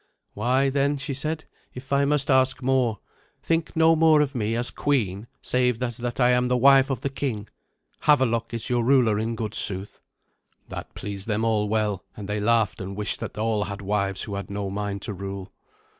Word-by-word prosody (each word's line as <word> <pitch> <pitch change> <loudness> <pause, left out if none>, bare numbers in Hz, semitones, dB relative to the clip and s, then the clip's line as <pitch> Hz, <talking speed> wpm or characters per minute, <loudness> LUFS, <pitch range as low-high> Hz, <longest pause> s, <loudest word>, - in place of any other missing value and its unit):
"Why 130 +5 +1
then," 140 +1 +1
she 135 0 -4
said, 155 +3 -3 0.3
"if 130 +2 -6
I 140 0 +3
must 145 -1 +1
ask 130 0 +3
more, 125 -4 +1 0.5
think 165 0 -1
no 165 0 +5
more 160 -1 +5
of 145 -1 -1
me 115 -3 -1
as 120 +1 -1
queen 110 -7 -1 0.2
save 125 -2 +1
as 120 -2 -2
that 120 +1 -4
I 125 -1 +5
am 125 0 +2
the 125 0 +2
wife 135 +1 +6
of 130 -4 -2
the 140 - -1
king. 115 -7 -3 0.6
Havelok 115 -6 +3
is 115 -2 -1
your 120 -1 +1
ruler 120 -5 +3
in 115 +1 -2
good 110 -2 -4
sooth." 95 +1 +2 0.7
That - - -8
pleased 100 0 -6
them 110 0 0
all 105 -2 +1
well, 105 -3 0
and 100 - -7
they 105 0 -2
laughed 110 0 +1
and 95 +1 -6
wished 105 +1 -2
that - - -6
all 110 -1 0
had 100 0 -7
wives 100 -1 0
who 105 - -6
had 100 0 -5
no 100 -1 -4
mind 100 0 -4
to 105 - -2
rule. 95 0 -7
115 Hz, 200 wpm, -25 LUFS, 105-135 Hz, 0.7 s, wife